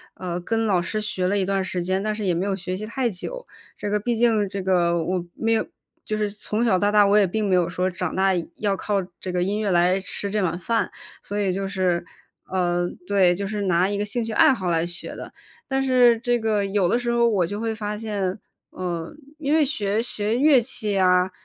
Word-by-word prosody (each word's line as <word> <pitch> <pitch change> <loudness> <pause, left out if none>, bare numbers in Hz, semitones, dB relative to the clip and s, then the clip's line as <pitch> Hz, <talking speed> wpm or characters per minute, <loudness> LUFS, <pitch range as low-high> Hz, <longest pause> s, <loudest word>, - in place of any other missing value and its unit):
呃， 180 -1 -4
跟 225 +4 -1
老 185 -4 +2
师 215 +5 -3
学 200 -4 -1
了 205 +2 +1
一 190 - +1
段 195 0 0
时 185 -1 -3
间， 190 +3 -1
但 215 - 0
是 210 -1 -4
也 180 - +2
没 175 +3 -1
有 200 - 0
学 185 -1 -4
习 210 +3 -5
太 240 +2 -1
久， - - -6 0.3
这 205 - -4
个 210 - +1
毕 230 +3 -1
竟 225 -3 +3
这 195 0 -4
个 175 -2 +2
我 180 +1 -2
没 225 0 0
有 225 - +1 0.4
就 215 - -2
是 210 -1 0
从 210 +3 -2
小 190 -5 +3
到 205 +2 +2
大， 210 -1 +5
我 205 +1 +4
也 205 - +5
并 210 +3 -1
没 190 - +3
有 175 -2 +2
说 180 +1 -1
长 180 -2 -3
大 190 0 +2 0.2
要 205 -2 0
靠 200 0 -1 0.2
这 185 - -4
个 180 - 0
音 205 +3 -1
乐 205 -2 0
来 180 +2 +3
吃 200 +1 -3
这 210 +1 0
碗 175 0 -1
饭。 225 +6 -1 0.3
所 205 +1 -4
以 195 -3 +1
就 195 0 -3
是， 185 -3 0 0.5
呃 175 -1 0 0.2
对， 190 -3 +4
就 200 +2 -3
是 210 0 -3
拿 185 -1 +2
一 205 - -2
个 205 - 0
兴 225 +3 -2
趣 225 - -4
爱 300 +5 +6
好 190 -7 -3
来 165 -1 +1
学 175 0 -7
的。 - - -8 0.4
但 270 0 +1
是 250 -3 +4
这 245 0 +1
个 215 -3 0
有 195 -2 +1
的 235 - +2
时 245 -1 -3
候 235 0 +3
我 195 -7 +2
就 205 +4 -4
会 225 0 -1
发 210 -1 -4
现， 205 -4 -2 0.4
嗯， 175 - -4 0.2
因 290 -2 -2
为 310 -1 +4
学 210 -7 0
学 225 -1 -1
乐 275 -2 +5
器 230 -3 -2
呀， 185 -1 +3
200 Hz, 255 characters per minute, -23 LUFS, 185-220 Hz, 0.5 s, 爱